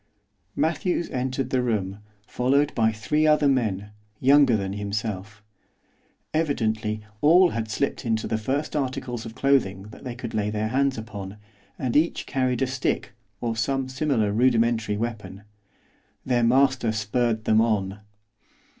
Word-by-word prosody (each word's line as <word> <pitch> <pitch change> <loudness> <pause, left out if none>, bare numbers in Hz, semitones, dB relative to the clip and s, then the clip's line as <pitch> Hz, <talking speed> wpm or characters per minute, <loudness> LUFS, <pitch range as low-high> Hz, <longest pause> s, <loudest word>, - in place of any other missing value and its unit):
Matthews 170 +3 0
entered 130 0 -2
the 130 - +2
room, 105 -5 -2 0.3
followed 140 +6 +1
by 110 -2 +2
three 150 +9 0
other 150 -1 +4
men, 105 -7 0 0.3
younger 135 -3 +5
than 95 -1 -3
himself. 105 0 -4 0.9
Evidently 110 -9 0 0.2
all 175 +4 +6
had 110 -1 -3
slipped 140 +7 -2
into 110 -3 -1
the 110 - -1
first 140 +8 -2
articles 125 -4 -3
of 110 - -10
clothing 115 -9 +1
they 125 +1 -8
could 120 -2 -6
lay 105 -1 0
their 110 +1 -2
hands 135 +1 +1
upon, 105 -2 -7 0.4
and 125 -3 -2
each 160 +3 +2
carried 130 -1 0
a - - +3
stick, 130 +1 -2 0.3
or 115 -2 -1
some 135 +4 -1
similar 130 -6 0
rudimentary 115 -2 +2
weapon. 105 -4 -5 0.8
Their 125 -2 +2
master 130 0 +3
spurred 110 +1 -1
them 110 0 +4
on. 105 -3 0
120 Hz, 135 wpm, -25 LUFS, 110-135 Hz, 0.9 s, all